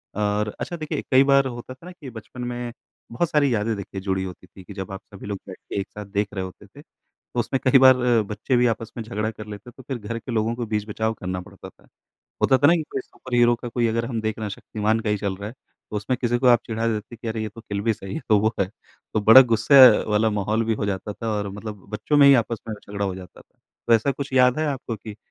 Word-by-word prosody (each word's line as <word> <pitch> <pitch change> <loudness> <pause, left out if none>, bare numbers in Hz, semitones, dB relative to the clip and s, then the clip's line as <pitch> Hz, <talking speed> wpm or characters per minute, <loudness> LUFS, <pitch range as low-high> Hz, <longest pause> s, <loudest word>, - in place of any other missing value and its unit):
और 105 0 0
अच्छा 175 - -4
देखिए 155 -2 -3
कई 130 0 +7
बार 140 -1 +4
होता 120 0 -7
था 130 +6 -17
ना 180 - -8
कि 160 -7 -10
बचपन 115 +1 -10
में 120 0 -4 0.4
बहुत 155 +8 0
सारी 145 -5 +2
यादें 110 +1 0
देखिए 100 0 -7
जुड़ी 95 -1 -1
होती 90 -1 -9
थी 95 - -15
कि 100 - -11
जब 95 -1 -6
आप 95 - -7
सभी 100 - -10
लोग 100 -2 -4
बैठ 95 - -9
के - - -2
एक 100 - -7
साथ 105 0 -8
देख 100 +1 -1
रहे 95 -2 -3
होते 95 - -12
थे - - -15
तो 120 - -10
उसमें 130 +3 0
कई 130 +1 +6
बार 130 0 +8
अ, 120 -2 +3
बच्चे 105 +5 -1
भी 125 0 +4
आपस 115 -1 -2
में 115 - -3
झगड़ा 110 -1 -3
कर 110 -1 -10
लेते 105 +2 -9
हैं - - -16
तो 130 - -12
फिर 135 - -3
घर 115 +1 -5
के 125 - -8
लोगों 115 0 0
को 120 0 -3
बीच-बचाव 110 +1 -2
करना 90 -3 -5
पड़ता - - -12
था, - - -26 0.6
होता 130 - +5
था 145 - +5
ना 165 - +6
कि 165 - 0
कोई 135 - -1
सुपर 130 0 -9
हीरो 120 0 +5
का 120 - -7
कोई 120 0 0
अगर 115 +1 0
हम 115 -3 -3
देख 110 0 -3
रहे 110 - -4
हैं - - -4
शक्तिमान 110 +2 -1
का 110 - -2
ही 105 - +2
चल 100 -1 -2
रहा 100 +2 -6
है 115 - -10 0.4
तो 105 - -3
उसमें 105 +5 -1
किसी 120 -1 +1
को 130 - +1
आप 120 -2 +6
चिढ़ा 115 0 -2
देते 110 +1 -4
कि 115 0 -6
अरे 110 0 -3
ये 110 - -3
तो 110 +2 -12
किल 100 -3 -4
भी 115 +2 +1
सही 95 -2 -8
है - - -3
तो 105 -2 +5
वो 110 +1 +2
है। 100 - +2 0.5
तो 110 - +2
बड़ा 110 +5 +9
गुस्से 115 +6 +4 0.3
वाला 110 +1 +3
माहौल 110 +3 0
भी 115 0 +1
हो - - 0
जाता 100 +1 -3
था 115 +3 -5
और 105 -1 -2
मतलब 105 0 -8
बच्चों 110 +7 -1
में 145 -1 +7
ही 140 - +8
आपस 115 0 -5
में 110 - -3
झगड़ा 100 -1 -5
हो 95 -2 -2
जाता 90 -1 -12
था। - - -24 0.3
तो 120 - +3
ऐसा 115 +5 +2
कुछ 140 +1 -6
याद 125 +1 +4
है 155 - 0
आपको 130 -5 -3
कि 105 0 -10
110 Hz, 280 wpm, -23 LUFS, 105-125 Hz, 0.6 s, बड़ा